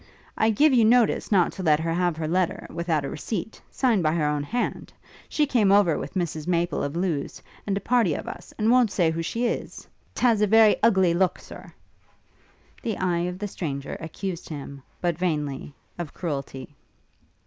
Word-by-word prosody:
'I 220 - +2
give 280 +7 +4
you 240 -3 +5
notice 235 0 +3
not 185 -4 +4
to - - -8
let 155 -4 +3
her 165 0 -1
have 175 -2 0
her 160 -1 -3
letter, 180 +1 0
without 165 -4 -1
a - - -3
receipt, 200 +6 -5
signed 235 -7 +1
by 155 -1 +1
her 160 -3 +1
own 150 0 0
hand. 240 +12 -3 0.4
She 300 - +2
came 230 -8 +2
over 200 -6 +4
with - - -7
Mrs 160 -4 -3
Maple 170 -3 0
of 145 +2 -3
Lewes, 170 -5 -2 0.3
and 195 -1 0
a - - -3
party 230 -11 +2
of - - -6
us, 175 - -8
and 220 +1 +2
won't 250 -3 +5
say 175 -4 +1
who 165 +1 -3
she 230 +9 -2
is. 235 - -4 0.3
'T - - -6
has 225 -4 +4
a 210 - +4
very 220 0 +6
ugly 190 -6 +4
look, 180 +1 +1
Sir!' - - -12 1.1
The 220 -4 -3
eye 175 -2 0
of 180 - -6
the 205 +2 -4
stranger 145 -8 -5
accused 170 +2 -6
him, 140 -2 -7 0.2
but 175 -2 -1
vainly, 150 -6 -2 0.3
of 170 -4 -6
cruelty. 140 -4 -5
175 Hz, 190 wpm, -25 LUFS, 155-210 Hz, 1.1 s, very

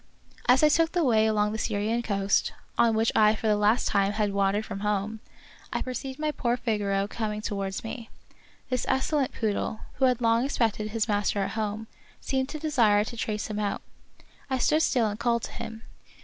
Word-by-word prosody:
As 260 +4 +6
I 305 - +7
took 330 +2 +2
the 350 -2 +2
way 220 -5 +4
along 210 -1 +1
the 220 - -4
Syrian 220 +2 0
coast, 200 -3 +1 0.2
on 230 -1 +3
which 225 +1 +2
I 215 0 +5
for 220 - -7
the 215 -1 +4
last 210 +3 +2
time 200 0 +2
had 210 -1 0
wandered 200 +2 +1
from 195 - -6
home, 210 +1 -1 0.5
I - - -1
perceived 260 +1 -5
my 305 0 -1
poor 245 -4 -1
Figaro 205 -4 0
coming 210 -1 -3
to - - -2
wards 195 -1 -3
me. 225 0 -7 0.6
This 255 -1 -1
excellent 265 +1 +1
poodle, 215 0 -2 0.2
who 265 - +3
had 250 -2 +2
long 230 0 +3
expected 225 -5 0
his 220 0 -1
master 205 -1 +1
at - - -3
home, 215 0 -3 0.3
seemed 265 0 -1
to 310 - -5
desire 240 -10 +3
to 235 - -7
trace 215 -2 -2
him 210 -1 -4
out. 205 -1 -2 0.7
I 260 - +1
stood 300 +5 +2
still 250 -6 +2
and 210 0 -3
called 235 -1 +1
to - - -5
him. 225 +1 -7
220 Hz, 200 wpm, -27 LUFS, 210-250 Hz, 0.7 s, I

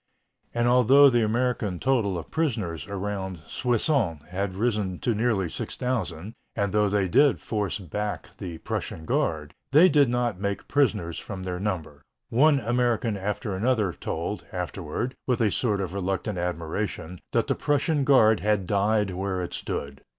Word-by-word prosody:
And 120 0 +1
although 130 +3 +6
the 120 -2 +3
American 110 -4 0
total 115 -9 +1
of 85 - -8
prisoners 110 - -1
around 95 -3 -4
Soissons 120 - 0
had 95 +1 -3
risen 105 -4 0
to 120 - 0
nearly 110 -4 +1
6,000, 105 -2 -3 0.2
and 100 -2 -1
though 105 -1 +3
they 100 -1 +1
did 140 +8 +4
force 105 -4 -2
back 105 +3 -4
the 90 -5 -6
Prussian 80 0 -4
guard, 80 -2 -1 0.2
they 155 +7 +7
did 145 -4 +4
not 120 -5 0
make 100 -1 -2
prisoners 105 - +1
from 95 -2 -7
their 90 -1 -3
number. 90 -8 -3 0.3
One 145 +4 +4
American 120 -1 +1
after 100 +1 -3
another 105 -3 +1
told, - - -4
afterward, 130 +2 -3
with 125 -3 +1
a 110 -3 +2
sort 105 -5 0
of 95 -2 -3
reluctant 95 +1 -2
admiration, 90 +1 -3
that - - +2
the - - +1
Prussian 145 +1 +1
guard 110 -6 +5
had 105 -2 +1
died 105 +1 +1
where 95 0 -2
it 90 - -6
stood. 70 -1 -4
105 Hz, 155 wpm, -26 LUFS, 95-120 Hz, 0.3 s, they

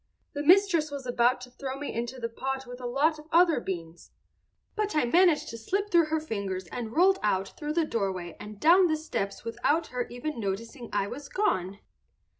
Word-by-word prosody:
The 290 - -3
mistress 345 -1 +4
was 280 -2 -6
about 245 +1 +2
to 250 0 -10
throw 265 +1 -5
me 290 +1 -5
into 240 +3 -4
the 230 - -2
pot 265 +3 -4
with 245 0 -9
a 245 - -3
lot 300 +5 +1
of 305 - -13
other 335 -3 +5
beans, 170 -5 -6 0.7
but 425 -3 -1
I 300 - +3
managed 340 +4 +4
to 230 - -7
slip 395 - -2
through 340 -2 +5
her 315 +1 0
fingers 200 -10 -4
and 230 -3 -4
rolled 380 +3 +5
out 195 -2 0
through 300 0 -5
the 330 0 +2
doorway 190 - -3
and 210 -1 -9
down 355 - +6
the 315 -1 +1
steps 200 -10 -4
without 240 +8 0
her 250 -1 -2
even 245 +2 -5
noticing 230 +5 -4
I 205 - +1
was 280 +8 -8
gone." 200 - -1
260 Hz, 200 wpm, -28 LUFS, 225-315 Hz, 0.7 s, down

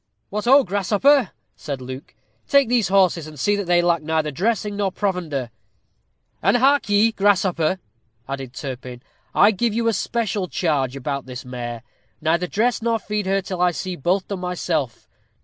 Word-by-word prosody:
"What 210 +2 -3
ho! 270 +3 +6
Grasshopper," 205 - +3 0.3
said 140 -3 -5
Luke, 130 +2 -9 0.3
"take 280 -2 +4
these 235 -4 +2
horses, 185 -4 +2
and 155 -2 -11
see 205 +10 +2
that 200 -1 -2
they 175 0 +3
lack 170 -2 +2
neither 155 -1 -1
dressing 210 - -1
nor 200 -2 0
provender." 170 - -2 0.9
"And 195 +7 +3
hark 275 0 +3
ye, 205 +2 +4
Grasshopper," 190 -5 +2 0.5
added 135 -2 -5
Turpin; 130 -2 -7 0.3
"I 205 - +6
give 220 +1 -1
you 230 0 0
a 230 - +3
special 210 -2 -1
charge 140 -8 0
about 140 0 -4
this 125 -1 -7
mare. 120 -2 -6 0.4
Neither 170 +3 +1
dress 230 +6 0
nor 230 0 +1
feed 210 -2 -3
her 195 0 +1
till 185 -2 -4
I 180 - +5
see 185 +1 -4
both 180 +5 0
done 200 -2 -4
myself. 170 -8 -3
180 Hz, 165 wpm, -22 LUFS, 150-210 Hz, 0.9 s, ho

